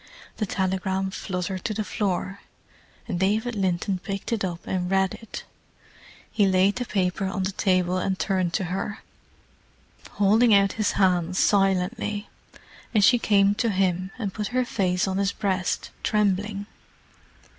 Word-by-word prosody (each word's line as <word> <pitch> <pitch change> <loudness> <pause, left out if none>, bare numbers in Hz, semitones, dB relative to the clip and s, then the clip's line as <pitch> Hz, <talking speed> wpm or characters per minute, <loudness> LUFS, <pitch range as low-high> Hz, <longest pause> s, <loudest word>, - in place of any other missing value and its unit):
The 215 - -1
telegram 190 0 -1
fluttered 185 -1 -4
to 215 - -1
the 215 - -1
floor, 195 -1 -2 0.7
and 175 - -2
David 215 +5 +1
Linton 190 0 0
picked 195 +4 -4
it 220 - -1
up 175 -2 -4
and 180 -1 -2
read 190 0 +2
it. 225 - -8 0.9
He 205 -3 +3
laid 190 +2 +3
the 250 - -2
paper 190 -2 -1
on 190 0 -2
the 190 - -1
table 185 -2 +1
and 190 0 -1
turned 185 -4 0
to - - 0
her, 205 +2 -4 1.1
holding 215 +3 +4
out 195 -1 +4
his 215 -2 0
hands 180 -2 +2
silently, 200 +2 +1 0.7
and 205 -2 +6
she 245 +2 +5
came 200 -2 +4
to 230 +2 0
him 185 -2 0
and 205 -6 -3
put 210 -1 -3
her 255 - +2
face 185 -5 0
on 190 0 -1
his 200 0 +1
breast, 190 -3 -1
trembling. 205 -1 0
195 Hz, 150 wpm, -25 LUFS, 185-205 Hz, 1.1 s, and